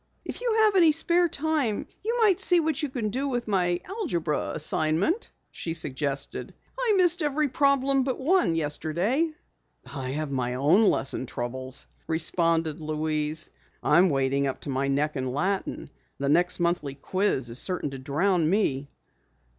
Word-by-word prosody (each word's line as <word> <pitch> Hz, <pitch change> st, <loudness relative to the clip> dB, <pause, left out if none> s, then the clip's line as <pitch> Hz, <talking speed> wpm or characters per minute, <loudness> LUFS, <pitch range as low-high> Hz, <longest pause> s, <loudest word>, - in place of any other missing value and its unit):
"If -, -, -6 dB
you -, -, 0 dB
have 425 Hz, -2 st, +3 dB
any 335 Hz, -4 st, +6 dB
spare 340 Hz, +3 st, +2 dB
time 295 Hz, -8 st, -1 dB, 0.2 s
you 460 Hz, +3 st, -1 dB
might 395 Hz, -5 st, +4 dB
see 355 Hz, -1 st, +4 dB
what 315 Hz, -3 st, -1 dB
you 295 Hz, -, -2 dB
can 235 Hz, -5 st, -2 dB
do 270 Hz, +5 st, -2 dB
with 245 Hz, -3 st, -2 dB
my 180 Hz, -4 st, +1 dB
algebra 235 Hz, -, -2 dB
assignment," 160 Hz, -, +1 dB, 0.2 s
she 165 Hz, -1 st, -5 dB
suggested. 140 Hz, -3 st, -3 dB, 0.2 s
"I -, -, +1 dB
missed 355 Hz, -1 st, +4 dB
every 300 Hz, 0 st, +1 dB
problem 275 Hz, 0 st, +2 dB
but 260 Hz, -1 st, -2 dB
one 315 Hz, -, +2 dB
yesterday." 170 Hz, -, 0 dB, 0.5 s
"I 130 Hz, -3 st, -6 dB
have 150 Hz, +1 st, -3 dB
my 125 Hz, -2 st, -1 dB
own 170 Hz, -, +4 dB
lesson 130 Hz, -1 st, -1 dB
troubles," 130 Hz, +3 st, -5 dB, 0.2 s
responded 165 Hz, -1 st, +1 dB
Louise. 155 Hz, 0 st, -1 dB, 0.3 s
"I'm 175 Hz, +5 st, +5 dB
wading 140 Hz, -1 st, +1 dB
up 135 Hz, -, -4 dB
to -, -, -7 dB
my 135 Hz, +1 st, -1 dB
neck 145 Hz, +3 st, 0 dB
in 130 Hz, -1 st, -2 dB
Latin, 185 Hz, +10 st, -1 dB
and -, -, -11 dB, 0.3 s
the 140 Hz, 0 st, -1 dB
next 175 Hz, +5 st, +3 dB
monthly 170 Hz, -5 st, -1 dB
quiz 140 Hz, -, -1 dB
is 120 Hz, -, -1 dB
certain 180 Hz, -6 st, -2 dB
to 135 Hz, -, -7 dB
drown 155 Hz, +5 st, +1 dB
me." 145 Hz, -9 st, 0 dB
170 Hz, 160 wpm, -26 LUFS, -, 0.5 s, any